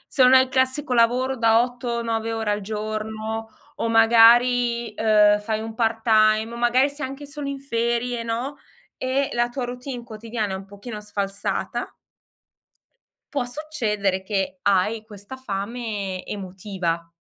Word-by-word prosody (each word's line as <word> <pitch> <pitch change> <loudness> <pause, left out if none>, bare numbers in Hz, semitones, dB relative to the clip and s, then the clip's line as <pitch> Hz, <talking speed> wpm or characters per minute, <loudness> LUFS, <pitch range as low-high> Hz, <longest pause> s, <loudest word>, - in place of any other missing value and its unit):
se 270 - +3
non 255 +1 +7
hai 260 - +8
il 260 - -7
classico 260 +1 0
lavoro 250 +3 +3
da 230 0 +4
8-9 235 -2 -3
ore 220 -2 -1
al 205 - -1
giorno 215 +1 -4 0.3
o 230 - -1
magari, 235 +1 +5
uhm, 210 -1 +4
fai 215 +1 -2
un 225 0 -6
part-time 220 -1 +2
o - - -6
magari 240 +3 +3
sei 285 -2 -5
anche 275 +2 -8
solo 290 0 -6
in 275 -1 -4
ferie, 235 -2 -1
no, 235 +5 -3 0.4
e 265 +2 -1
la 240 0 +1
tua 245 0 -3
routine 245 0 -6
quotidiana 220 -2 -4
è - - -2
un 190 0 -8
pochino 210 +2 -8
sfalsata 200 -1 -3 1.4
può 270 -4 0
succedere 220 -9 -2
che 190 -1 -2
hai 200 +3 +1
questa 210 +4 -11
fame 205 -4 -4
emotiva, 185 -4 -4
225 Hz, 145 wpm, -23 LUFS, 210-245 Hz, 1.4 s, hai